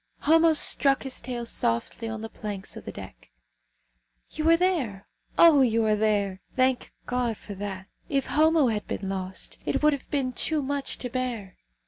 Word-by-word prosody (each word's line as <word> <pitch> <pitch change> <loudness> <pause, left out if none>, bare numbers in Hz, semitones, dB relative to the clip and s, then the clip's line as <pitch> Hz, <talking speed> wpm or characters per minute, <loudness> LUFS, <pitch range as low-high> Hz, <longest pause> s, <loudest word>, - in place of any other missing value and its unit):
Homo 325 +2 +4
struck 275 -2 +5
his 265 -2 -3
tail 240 -2 -5
softly 225 - -2
on 220 -1 -5
the 225 - -5
planks 205 -3 -7
of - - -10
the - - -6
deck. - - -11 1.0
"You 315 +1 0
are 330 - +6
there. 285 - -1 0.3
Oh! 320 -5 +7
you 230 -3 +2
are 215 -1 +3
there! 205 -3 0
Thank 255 -1 +1
God 245 -3 -1
for 205 - -9
that. 195 -1 -6 0.2
If 275 -1 0
Homo 310 -3 +3
had 210 -2 -3
been 195 - -4
lost, 190 -1 -4
it - - -2
would 300 0 +5
have 280 - -7
been 265 -3 -1
too 305 +3 0
much 280 0 -3
to 250 - -5
bear. 240 -7 -4
245 Hz, 175 wpm, -26 LUFS, 210-285 Hz, 1.0 s, Oh